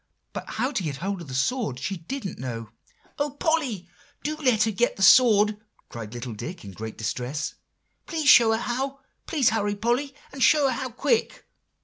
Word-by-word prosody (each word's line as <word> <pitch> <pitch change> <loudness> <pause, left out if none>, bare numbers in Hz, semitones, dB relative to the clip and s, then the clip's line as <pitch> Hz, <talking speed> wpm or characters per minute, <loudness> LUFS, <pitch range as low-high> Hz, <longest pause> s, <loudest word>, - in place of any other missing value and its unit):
But - - -6
how 260 - 0
to 235 - -1
get 150 -5 -3
hold 190 +5 -3
of 165 - -9
the 130 - -6
sword, 140 - 0
she 190 +9 -3
didn't 195 +4 -6
know." 115 -3 -5 0.5
"O 290 +1 +1
Polly, 285 - -1 0.4
do 305 +1 -1
let 250 -8 +3
her 220 - +1
get 240 +4 +1
that 195 - -2
sword!" 215 -3 +6 0.3
cried 115 -1 -8
little 120 -1 -5
Dick 160 - -7
in 100 - -8
great 110 +3 -7
distress. 125 +6 -3 0.5
"Please 315 -4 -2
show 235 -4 +8
her 225 - +2
how. 265 +4 -3 0.3
Please 285 -7 +3
hurry, 210 -2 0
Polly, 240 +6 -1 0.2
and 270 - -8
show 300 0 +5
her 260 - +1
how 260 +1 -3
quick." 445 - 0
220 Hz, 190 wpm, -25 LUFS, -, 0.5 s, show